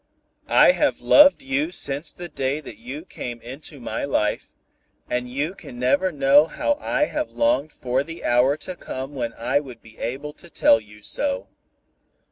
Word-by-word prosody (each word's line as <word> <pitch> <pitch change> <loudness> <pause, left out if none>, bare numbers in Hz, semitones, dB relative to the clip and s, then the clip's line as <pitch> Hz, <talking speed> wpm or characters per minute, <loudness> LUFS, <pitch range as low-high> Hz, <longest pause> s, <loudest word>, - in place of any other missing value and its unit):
I - - +6
have - - 0
loved 290 -1 +6
you 275 +4 0
since 145 - -3
the 175 - -8
day 140 -2 -2
that 125 -8 -10
you 135 +8 -8
came 120 -9 -7
into 135 +5 -9
my 120 - -4
life, 140 -6 -1 0.6
and 125 0 -2
you 145 +7 -2
can 125 -10 -11
never 185 +10 +2
know 145 +1 +5
how 290 - -1
I 300 +1 +1
have 305 0 -3
longed 290 - +1
for 130 +2 -1
the 165 +2 -9
hour 125 +4 +3
to 185 - -5
come 135 -3 -6
when 120 -4 -3
I 120 +4 0
would 130 -5 -10
be 110 -1 -17
able 140 +5 -4
to 175 - -16
tell 115 - +4
you 105 -1 -17
so. 280 - -2
140 Hz, 175 wpm, -23 LUFS, 125-180 Hz, 0.6 s, I